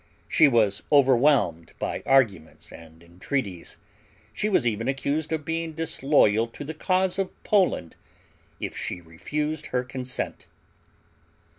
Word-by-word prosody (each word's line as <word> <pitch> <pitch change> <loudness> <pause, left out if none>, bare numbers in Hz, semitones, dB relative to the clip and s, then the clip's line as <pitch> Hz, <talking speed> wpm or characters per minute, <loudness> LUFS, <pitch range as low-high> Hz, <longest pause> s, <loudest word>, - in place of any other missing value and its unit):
She 155 - +5
was 110 -6 +2
overwhelmed 130 - +3
by - - -3
arguments 110 -12 +1
and 80 0 -14
entreaties. 90 +2 -4 0.6
She 210 - -1
was 185 -11 +2
even 115 0 -1
accused 140 +3 -1
of 155 -2 -2
being 165 0 -3
disloyal 140 -8 +2
to 115 - -9
the 155 +3 -6
cause 185 +3 0
of 195 - 0
Poland 185 - +1 0.6
if - - -5
she 90 - -4
refused 150 - -4
her 125 0 -1
consent. 125 0 -4
135 Hz, 125 wpm, -25 LUFS, 100-155 Hz, 0.6 s, She